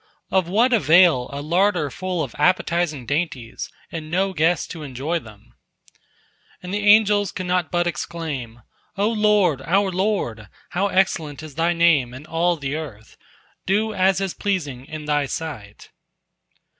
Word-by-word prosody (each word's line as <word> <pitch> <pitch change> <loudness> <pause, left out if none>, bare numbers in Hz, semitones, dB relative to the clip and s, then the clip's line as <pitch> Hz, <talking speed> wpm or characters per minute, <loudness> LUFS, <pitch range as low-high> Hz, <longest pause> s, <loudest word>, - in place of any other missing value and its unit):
Of 190 -3 +2
what 235 +7 +3
avail 170 - +5
a 140 +1 -5
larder 175 -2 +1
full 180 +1 -3
of 130 - -7
appetizing 170 -4 +1
dainties, 140 -4 -3 0.2
and 160 -2 -6
no 190 +3 0
guest 165 0 +1
to 165 - -7
enjoy 145 +4 -3
them?" 110 -6 -16 1.1
And 180 +1 -6
the 205 0 -1
angels 205 -2 +5
could 185 - -5
not 180 -2 0
but 175 0 +1
exclaim: 140 -7 -5 0.3
"O 200 +1 +2
Lord, 210 - +2
our 190 +7 +1
Lord, 180 - -2 0.2
how 190 +3 +1
excellent 160 -6 0
is 155 -2 -9
Thy 165 +4 +1
name 155 -8 +3
in 135 +4 -10
all 170 +2 0
the 140 -1 -3
earth! 125 -9 -8 0.5
Do 215 +3 +1
as 190 -1 +2
is 195 -2 -2
pleasing 145 -11 -3
in 155 -1 -7
Thy 145 -1 +1
sight." 120 -9 -7
170 Hz, 150 wpm, -22 LUFS, 145-190 Hz, 1.1 s, avail